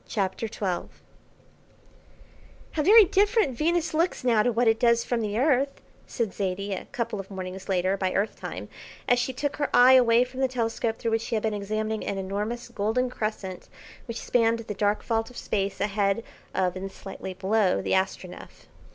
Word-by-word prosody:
CHAPTER 200 +1 -2
XII 190 -4 -3 1.8
"How 310 - -1
very 420 +6 +8
different 400 - +2
Venus 335 +5 0
looks 330 -1 0
now 235 -4 +4
to 245 - +2
what 235 +1 +1
it 225 0 +3
does 235 -1 +4
from 240 -2 -1
the 210 -1 -2
earth," 275 +1 +2 0.3
said 225 -5 -2
Zaidie, 195 0 -2
a 190 - -5
couple 235 -5 -4
of 195 - -7
mornings 190 0 -7
later, 185 0 +1
by 190 -1 0
earth 205 +2 0
time, - - -6 0.4
as 245 - +4
she 260 - -1
took 285 +2 -3
her 290 - -1
eye 250 +1 +8
away 240 -2 +6
from 255 +1 -9
the 265 - +3
telescope 230 -2 -2
through 230 - -2
which 225 0 +1
she 230 - -3
had 215 - -1
been 220 -1 0
examining 215 +1 -2
an 200 - -3
enormous 205 +5 -3
golden 240 +3 0
crescent 210 -5 -4 0.4
which 230 -1 -5
spanned 230 -1 +2
the 220 -2 -5
dark 205 +1 0
vault 225 -1 -1
of 250 - -13
Space 195 -1 -2
ahead 200 +1 0 0.3
of 185 -1 +1
and 190 +1 -5
slightly 190 -1 -8
below 190 +1 +2
the - - -3
Astronef. 190 -1 -3
225 Hz, 185 wpm, -26 LUFS, 195-245 Hz, 1.8 s, very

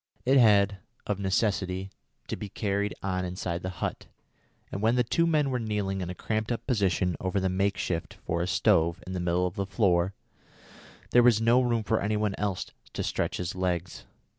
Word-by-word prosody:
It 135 +2 +5
had, 100 -4 +5 0.3
of 105 -1 -2
necessity, 95 -1 0 0.4
to - - -3
be 105 - -7
carried 100 0 -1
on 90 -1 -1
inside 90 -1 -3
the 95 - -3
hut, 90 - -4 0.6
and 100 - -4
when 115 +2 +3
the 125 - +3
two 165 +8 +1
men 150 -4 +2
were 125 - 0
kneeling 105 -4 -2
in 90 - -4
a 90 - -5
cramped 110 +3 -2
up 120 - -3
position 95 -7 +1
over 95 +2 -1
the 95 0 0
make 95 +1 0
shift 85 -3 -3
for 85 0 -1
a 90 - -1
stove 85 0 +2
in 95 - -6
the 90 - -2
middle 90 +1 +1
of 90 - -2
the 100 -1 -1
floor, 95 -3 +2 1.0
there 120 - +7
was 120 -3 +5
no 115 +3 +4
room 120 -3 +1
for 110 +1 +1
any 105 +1 0
one 105 -1 0
else 100 -2 -1 0.3
to - - -2
stretch - - -1
his 90 0 -3
legs. 90 -1 -2
100 Hz, 200 wpm, -28 LUFS, 90-110 Hz, 1.0 s, there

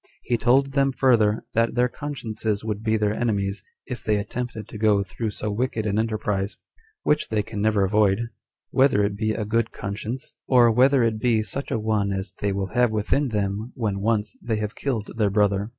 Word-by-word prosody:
He 120 - 0
told 130 +4 +3
them 135 0 +2
further, 115 -5 +3
that 115 +1 +1
their 125 0 +3
consciences 115 -7 -3
would 105 -1 -2
be 110 0 +1
their 105 -1 +1
enemies, 100 -3 -1 0.2
if 125 - -6
they 105 -1 +2
attempted 110 +1 -4
to 105 - -9
go 105 -2 +3
through 110 +4 -4
so 105 0 -4
wicked 115 0 -1
an 105 0 +1
enterprise, 105 -3 -1 0.5
which 150 0 +2
they 110 -2 0
can 110 -1 -5
never 105 -2 +3
avoid, 100 0 +3 0.5
whether 130 -6 +4
it 100 0 -2
be 110 +1 -1
a 110 - -3
good 115 +2 0
conscience; 110 +9 -5
or 120 -3 +6
whether 130 +2 +4
it 110 -2 +1
be 115 -2 +2
such 135 +7 -5
a - - 0
one 105 -2 0
as 95 0 -4
they 100 - 0
will 95 -1 -3
have 125 -2 +3
within 110 +7 +1
them 105 +1 -2
when 105 -5 -1
once 105 0 0
they 115 -2 -1
have 105 0 -3
killed 120 -7 -3
their 105 -3 +3
brother. 100 0 +1
110 Hz, 200 wpm, -24 LUFS, 105-120 Hz, 0.5 s, or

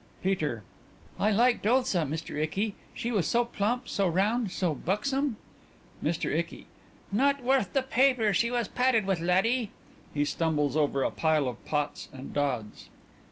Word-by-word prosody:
_) - - -25
PETER: 155 - -1 0.6
I 210 - +3
liked 235 +1 +3
Ulsa, 250 -6 +3
Mr. 155 +2 -5
Icky; 190 +8 -1 0.2
she 240 -1 -4
was 195 -9 +1
so 240 0 +2
plump, 235 +2 -1
so 195 -1 +1
round, 205 +6 +1
so 180 -3 -1
buxom. 250 - -1 0.7
MR. - - -1
ICKY: - - -3 0.5
Not 275 +5 +2
worth 255 -7 +2
the 270 - +2
paper 255 -5 +3
she 235 +6 +2
was 240 -3 -1
padded 250 -3 +2
with, 190 -3 0
laddie. 195 +7 +2 0.5
(_He 145 0 +2
stumbles 150 -3 0
over 145 -3 +1
a - - 0
pile 155 -4 +1
of 125 -3 -6
pots 150 -1 -2
and 135 0 -9
dods. 125 -7 -2
195 Hz, 160 wpm, -28 LUFS, 155-240 Hz, 0.7 s, I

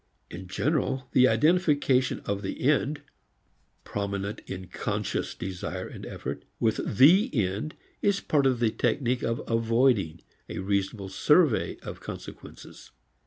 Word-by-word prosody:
In 95 +1 -8
general, 130 - -1
the 130 0 +6
identification 145 -1 +2
of 100 0 -3
the 95 - -5
end 145 +1 +1 0.8
prominent 100 +1 -3
in 95 0 -6
conscious - - -3
desire 90 -1 -5
and - - -9
effort - - -6 0.2
with 110 -2 0
the 175 - +7
end 105 +7 -1 0.3
is 200 -1 +2
part 140 -3 +2
of 130 -3 +1
the 115 -2 +2
technique 120 +2 0
of 115 0 -2
avoiding 115 -7 +2 0.3
a - - -5
reasonable 100 +1 -1
survey 150 - +3
of - - -7
consequences. - - -10
115 Hz, 125 wpm, -27 LUFS, 100-140 Hz, 0.8 s, the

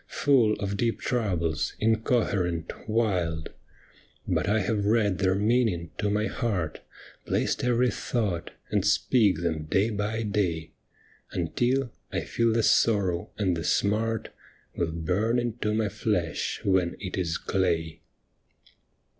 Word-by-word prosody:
Full 125 -7 +3
of 100 -1 -3
deep 115 +2 0
troubles, 85 -10 -1
incoherent, 110 -7 +1 0.2
wild. 90 -8 0 0.8
But - - 0
I 105 -1 +2
hav^ 105 +1 0
read 105 -3 +2
their 95 -1 +2
meaning 105 -5 +1
to 105 -1 +1
my 105 +1 +1
heart, 95 -10 -2 0.5
Placed - - 0
every 125 0 +3
thought, 105 -8 -2 0.2
and 105 -2 +2
speak 105 -3 +3
them 80 -2 -1
day 100 +8 +1
by 105 +2 -2
day. 90 -6 -1 0.6
Until 120 +9 0 0.2
I - - -1
feel 115 -1 +1
the 115 0 +2
sorrow 95 -8 +2
and 95 -4 +1
the 80 - -4
smart 110 +6 0 0.5
Will 85 -2 -1
burn 90 +9 0
into 120 -3 -1
my 110 0 +1
flesh 100 -7 -1
when 95 -3 +2
it 95 -3 -5
is 85 -3 -1
clay. 85 -4 -1
100 Hz, 130 wpm, -27 LUFS, 85-115 Hz, 0.8 s, Full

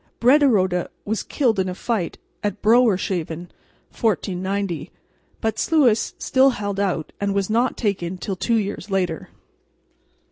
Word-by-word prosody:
Brederode 230 - +4 0.2
was 220 0 -1
killed 235 -8 0
in 185 -1 0
a 180 - -4
fight 210 -5 -2 0.3
at 205 -2 -3
Brouwershaven 190 -7 +2 0.4
(1490), 195 -3 -1 0.5
but 220 -1 -1
Sluis 255 -9 +2
still 265 +1 +4
held 205 -5 -3
out 180 -6 -1
and 200 -1 0
was 200 +1 0
not 240 +3 +1
taken 185 -5 -2
till 190 +2 -4
two 230 +5 0
years 205 -1 -2
later. 180 -5 -1
200 Hz, 130 wpm, -22 LUFS, 185-230 Hz, 0.5 s, Brederode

